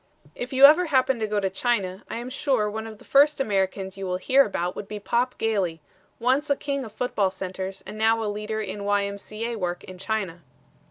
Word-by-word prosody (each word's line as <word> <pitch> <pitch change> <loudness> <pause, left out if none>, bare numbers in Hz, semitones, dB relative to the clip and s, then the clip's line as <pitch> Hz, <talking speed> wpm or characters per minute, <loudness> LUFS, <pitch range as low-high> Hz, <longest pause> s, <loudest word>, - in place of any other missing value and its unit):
If 245 +9 -6
you 265 +1 +8
ever 325 +5 +7
happen 265 -4 +2
to 215 - -1
go 210 0 0
to 195 -1 -1
China, 190 -3 -1
I - - -4
am 240 +2 -6
sure 255 -6 +1
one 220 +1 -4
of 220 -1 -9
the - - -18
first 290 +2 +5
Americans 195 -4 -1
you 195 -1 -4
will 180 0 -1
hear 265 +9 +4
about 180 -5 -2
would 200 - -6
be 210 0 -6
Pop 240 +5 0
Gailey, 195 -7 0 0.4
once 260 +5 +1
a 280 - +4
king 280 -1 -3
of 220 - -8
football 210 -6 0
centers 190 0 -6
and 215 - -8
now 225 +1 +3
a - - -2
leader 210 +1 -3
in 205 -1 -5
Y. 205 0 +2
M. 200 0 -5
C. 215 +3 -6
A. 235 0 -2
work 175 -1 -3
in 185 -1 -11
China. 195 -4 -3
215 Hz, 230 wpm, -25 LUFS, 195-245 Hz, 0.4 s, you